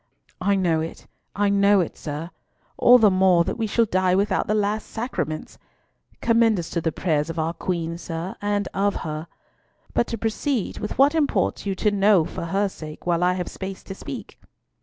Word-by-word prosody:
"I 200 +2 +2
know 175 -4 +2
it, 160 - -7 0.3
I 205 0 +2
know 200 0 +4
it, 175 - -1
sir. 155 +4 -6 0.4
All 245 +1 +7
the 215 -4 +5
more 185 -2 +4
that 170 - -4
we 225 - 0
shall 230 +2 +2
die 185 -2 +2
without 200 +2 +1
the 215 - +1
last 210 +1 0
sacraments. 160 - -4 0.6
Commend 230 -2 +3
us 170 -2 -5
to 170 - -1
the 160 - 0
prayers 155 -2 0
of 165 - -5
our 160 +1 0
Queen, 170 -1 -3
sir, 170 +1 -5
and 205 -1 0
of 200 +1 +1
her. 155 +1 -4 0.7
But 235 - +2
to 230 - -3
proceed 225 +2 -2
with 210 - -5
what 280 +3 +5
imports 300 -8 0
you 195 - -1
to 210 +2 +1
know 200 -4 +4
for 170 - -5
her 195 +4 +1
sake, 155 -5 -10
while 175 0 +1
I 180 0 +3
have 180 -1 -3
space 190 0 -7
to 195 - -7
speak." - - -8
190 Hz, 195 wpm, -23 LUFS, 170-210 Hz, 0.7 s, All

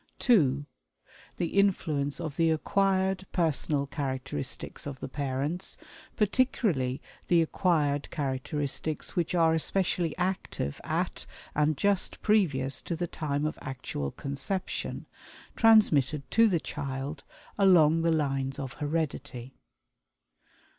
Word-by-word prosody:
(2) 145 - +3 0.7
The 175 +3 0
influence 150 -8 +1
of 155 -4 -4
the 165 -1 +3
acquired 190 +3 +1
personal 155 -4 +1
characteristics 135 - -4
of 135 -2 -6
the - - -5
parents 140 +6 -3 0.4
(particularly 205 - +1 0.2
the 170 -2 +4
acquired 150 -4 +1
characteristics 145 +1 -3
which 175 0 0
are 165 -2 +4
especially 175 0 0
active 180 - -2
at - - -2 0.3
and 150 0 +2
just 200 +2 +1
previous 145 -11 +2
to 170 - -3
the 175 +2 -2
time 150 -3 -2
of 155 - -3
actual 125 - -4
conception), 140 - -4 0.5
transmitted 155 - +4
to 230 0 +6
the 180 -6 +2
child 140 0 -5 0.4
along 165 -5 +6
the 165 - +2
lines 135 -4 0
of 135 -2 -5
heredity. 145 -5 -3
155 Hz, 110 wpm, -29 LUFS, 140-180 Hz, 0.7 s, to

